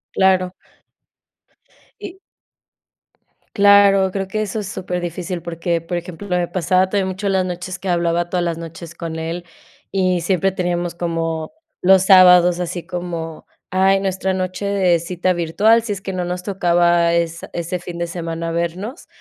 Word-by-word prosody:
Claro. 185 -1 +3 1.5
Y 390 -2 -8 1.4
Claro, 200 -2 +5
creo 195 0 -3
que 215 +3 -2
eso 215 +1 -3
es 205 - -5
súper 180 -2 -4
difícil 175 +1 -4
porque, 170 0 -2
por 165 +2 -5
ejemplo, 175 +3 -6
me 180 -2 +1
pasaba 185 +1 +1
todavía 200 -1 0
mucho 190 +2 -3
en 195 - +1
las 190 -1 +2
noches 180 +1 -5
que 190 - -7
hablaba 175 -1 0
todas 180 -1 0
las 170 -1 -2
noches 165 0 -9
con 165 -1 -5
él 165 +2 -4 0.5
y 185 -2 +2
siempre 190 +2 +1
teníamos 175 -2 -2
como 165 - -3 0.3
los 190 0 +5
sábados, 180 -2 +7
así 175 -1 -4
como, 170 -3 -6 0.2
ay, 190 +1 +3
nuestra 190 0 -1
noche 185 +1 -3
de 190 -4 +2
cita 180 +2 -1
virtual, 200 +7 +3
si 215 -3 -2
es 195 - -7
que 195 - -5
no 180 -1 -3
nos 180 +1 -4
tocaba 175 -3 +2
es 170 -1 -1
ese 175 +1 -3
fin 175 0 -8
de 170 0 -2
semana 165 -1 -4
vernos. 175 - -4
180 Hz, 160 wpm, -19 LUFS, 170-190 Hz, 1.5 s, sábados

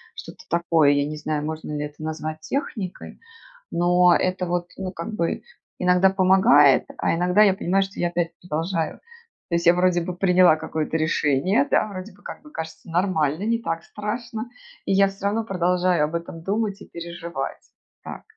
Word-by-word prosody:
что-то 450 +1 -10
такое, 165 -4 +3
я 145 0 +1
не 155 - -5
знаю, 150 0 -3
можно 155 -1 -5
ли 150 0 -2
это 150 +1 -10
назвать 155 0 -5
техникой, 195 - -5 0.5
но 175 +1 +4
это 185 0 0
вот, 175 0 -2
ну 190 -1 -4
как 175 +4 -6
бы, 170 -5 -2 0.4
иногда 180 +1 +4
помогает, 185 -7 +5
а - - +1
иногда 180 +4 +4
я 195 -2 +5
понимаю, 195 +1 +1
что 195 +1 -9
я 175 - +1
опять 175 -1 -1
продолжаю. 165 0 -2 0.5
То 170 - 0
есть 170 - -1
я 170 - +7
вроде 180 0 +2
бы 175 +1 -4
приняла 180 -3 +5
какое-то 160 0 -4
решение, 160 - +1
да, - - +3
вроде 190 0 -8
бы, 205 - -23
как - - -8
бы 300 0 -16
кажется 160 +1 -8
нормально, 165 -2 0
не 230 +1 +1
так 165 -5 -3
страшно, 225 +2 -5 0.4
и 195 - +1
я 195 0 +4
всё 195 0 -9
равно 215 +3 +1
продолжаю 180 -4 +1
об 160 +3 -5
этом 165 0 -5
думать 205 0 -2
и - - -11
переживать. 170 0 -6 0.4
Так. - - -8
175 Hz, 180 wpm, -23 LUFS, 160-195 Hz, 0.5 s, я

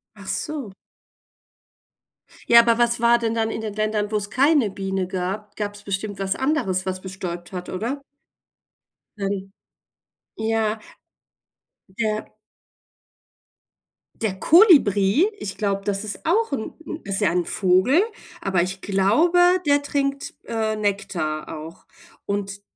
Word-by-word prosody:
Ach 200 -1 -13
so. 220 +2 -4 1.8
Ja, 235 - +9
aber 230 -1 +4
was 240 0 +2
war 235 +1 +4
denn 230 -1 -1
dann 225 -1 0
in - - -4
den 215 -2 -4
Ländern, 215 0 -1
wo 215 - +1
es 205 0 -4
keine 275 -3 +3
Biene 195 -1 -3
gab? 195 +3 -4
Gab's 205 -1 -5
bestimmt 200 0 -4
was 195 0 -1
anderes, 265 -10 0
was 185 -1 -3
bestäubt 180 -2 -6
hat, 180 -1 -6
oder? 245 +9 -3 1.1
Mhm. 195 -1 -3 0.9
Ja. 220 0 0 1.2
Ja. 215 -2 -2 1.9
Der 210 -4 0
Kolibri, 290 - +5
ich 195 - -6
glaube, 200 -2 -1
das 200 0 -1
ist 210 -1 -5
auch 425 +6 +2
ist 275 - 0
'n - - -7
'n 310 - -6
ist 195 -1 -2
ja 195 -5 +3
'n 175 0 0
Vogel, 195 - +3 0.4
aber 190 -3 +1
ich 185 +2 -3
glaube, 210 - +3 0.3
der 285 0 +4
trinkt, 275 -1 -2
äh, 220 -1 -1
Nektar 195 -7 -2
auch. 160 +3 -10 0.4
Und 200 0 -3
205 Hz, 130 wpm, -23 LUFS, 195-235 Hz, 1.9 s, Ja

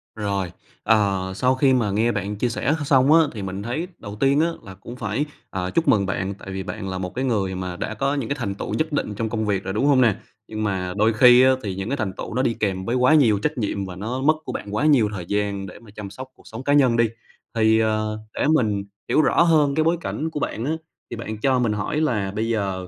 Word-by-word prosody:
Rồi, 100 -4 -2 0.3
ờ, 100 -4 +2
sau 125 +6 +2
khi 130 0 +3
mà 115 -6 +1
nghe 115 +4 +2
bạn 100 0 -3
chia 120 +4 0
sẻ 140 +5 0
x - - -3
xong 135 +1 +4
á 165 - +7
thì 105 - -6
mình 95 +1 -5
thấy 155 +10 -3
đầu 105 -1 -8
tiên 140 +2 +3
á 165 - +3 0.2
là 95 -2 -10
cũng 115 +6 -10
phải, 115 +5 -2 0.2
à, 90 -1 -3
chúc 165 - 0
mừng 100 -3 +4
bạn, 95 +1 -2
tại 95 - -10
vì 95 0 -4
bạn 95 -1 -5
là 95 - -3
một 90 +2 -5
cái 130 +1 -1
người 100 -6 0
mà 90 -1 -4
đã 110 - -4
có 135 +6 0
những 135 -6 -3
cái 140 - 0
thành 100 -4 -3
tựu - - -5
nhất 155 0 -1
định 125 -7 -1
trong 110 +1 -2
công 110 -1 -2
việc 100 -2 0
rồi, 95 +1 -4
đúng 120 +6 0
hông 135 -3 +5
nè? 110 -5 +4 0.3
Nhưng 110 0 -4
mà 95 -3 -2
đôi 110 +2 +3
khi 125 +2 +7
á 130 - +6
thì 95 -3 -3
những 95 +3 -4
cái 140 - -1
thành 100 -5 -2
tựu - - -6
nó 130 - +2
đi 115 - +1
kèm 95 -3 -1
với 120 - -1
quá 130 +4 +4
nhiều 110 -9 +4
trách 150 +4 -2
nhiệm 100 -3 -2
và 90 -1 -7
nó 120 +7 -4
mất 155 +3 +4
của - - -4
bạn 105 +1 -5
quá 145 - +1
nhiều 125 -9 +4
thời 90 -4 -5
gian 100 0 -1
để - - -11
mà 110 -3 -16
chăm 100 -2 -7
sóc 130 +5 -9
cuộc - - -20
sống 115 +4 -8
cá 145 - +2
nhân 130 -5 +4
đi. 115 -2 +3 0.5
Thì, 110 0 +4
ờ, 110 -1 0 0.2
để - - +1
mình 105 -8 +1 0.3
hiểu 155 - +4
rõ - - +3
hơn 150 -4 +3
cái 155 - +3
bối 165 +2 +2
cảnh 160 0 -3
của 150 - -4
bạn 115 -3 -3
á, 150 - 0 0.4
thì 120 - -5
bạn 110 -1 -5
cho 130 -2 +2
mình 115 -3 +1
hỏi 125 +10 -2
là 105 -10 0
bây 110 +3 -2
giờ, 95 -4 -2
110 Hz, 275 wpm, -23 LUFS, 100-130 Hz, 0.5 s, á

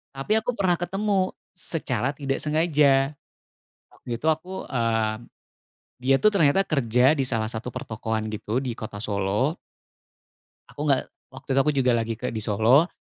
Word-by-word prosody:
tapi 175 +12 +1
aku 245 +2 -3
pernah 185 -3 +2
ketemu 190 +1 0 0.2
secara 140 -7 -2
tidak 135 -1 -2
sengaja. 150 -3 +3 0.8
Waktu 120 - -6
itu 155 - -1
aku 180 +5 -4
eee, 115 -3 +1 0.8
dia, 130 +2 +2
tuh, 215 - +6
ternyata 190 -3 +3
kerja 130 0 +3
di 135 - +1
salah 110 -4 +1
satu 115 +1 -5
pertokoan, 110 0 -3
gitu, 110 +3 -2
di 125 -4 -4
kota 110 -2 -7
Solo. 105 - 0 1.1
Aku 145 - -6
nggak 140 -3 +2 0.2
waktu 135 +2 -13
itu - - +4
aku 150 - +2
juga 130 -2 +3
lagi 115 0 -1
ke - - -3
di 110 - -4
Solo, 115 - +4
135 Hz, 150 wpm, -25 LUFS, 115-155 Hz, 1.1 s, tuh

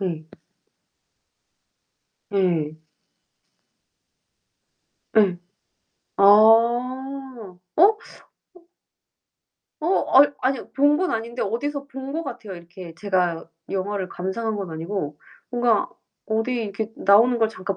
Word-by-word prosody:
네. 170 -5 -3 2.1
예. 165 -6 0 2.3
예. 195 -4 +4 0.8
아 - - +1
어? 235 +1 +3 0.2
어. 405 +6 +6 1.8
어 345 +5 +1
아이 285 - +9
아니 260 +1 0
본 290 +2 +3
건 370 +1 0
아닌데 230 +2 -4
어디서 280 +7 -3
본 270 0 -8
것 325 +2 -3
같아요. 235 - -8
이렇게 170 0 -11
제가 180 -3 -1 0.3
영화를 195 0 -3
감상한 210 +5 -3
건 195 -4 -5
아니고 160 -2 -5 0.3
뭔가 240 -3 +1 0.4
어디 225 +3 -1
이렇게 210 +1 -5
나오는 230 +5 +4
걸 225 -1 +2
잠깐 195 -3 -5
220 Hz, 175 characters per minute, -23 LUFS, 185-255 Hz, 2.3 s, 아이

